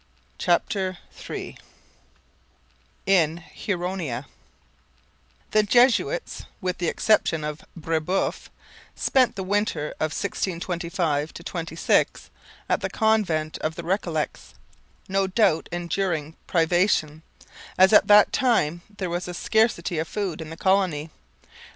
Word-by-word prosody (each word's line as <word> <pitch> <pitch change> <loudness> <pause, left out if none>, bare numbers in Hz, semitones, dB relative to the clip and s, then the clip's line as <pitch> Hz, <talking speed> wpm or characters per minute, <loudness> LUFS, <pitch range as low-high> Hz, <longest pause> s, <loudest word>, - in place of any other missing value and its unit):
CHAPTER 190 -3 0 0.3
III - - -6 1.5
IN 170 -5 +3
HURONIA 175 - -4 1.3
The 215 - +5
Jesuits, 245 - +2
with 180 -3 -3
the 175 - -1
exception 165 -5 +2
of 150 0 -4
Brebeuf, 165 +2 -1 0.5
spent 260 -2 +2
the 195 - -4
winter 200 -6 0
of 155 - 0
1625 170 -5 -2
26 170 -1 -1 0.4
at - - +1
the - - -2
convent 195 -9 +1
of 155 +1 -2
the 170 - -6
Recollets, 170 -3 -2 0.5
no 195 0 +1
doubt 190 -5 +2
enduring 170 -3 -2
privation, 165 -2 +2 0.6
as 190 +2 +6
at - - +7
that 210 0 +6
time 175 - +2 0.2
there 190 - -2
was 175 +1 -3
a 180 - -5
scarcity 200 -7 +1
of 160 - -2
food 190 -7 -3
in 155 - -7
the 160 - -8
colony. 180 -5 +1
175 Hz, 110 wpm, -24 LUFS, 160-195 Hz, 1.5 s, at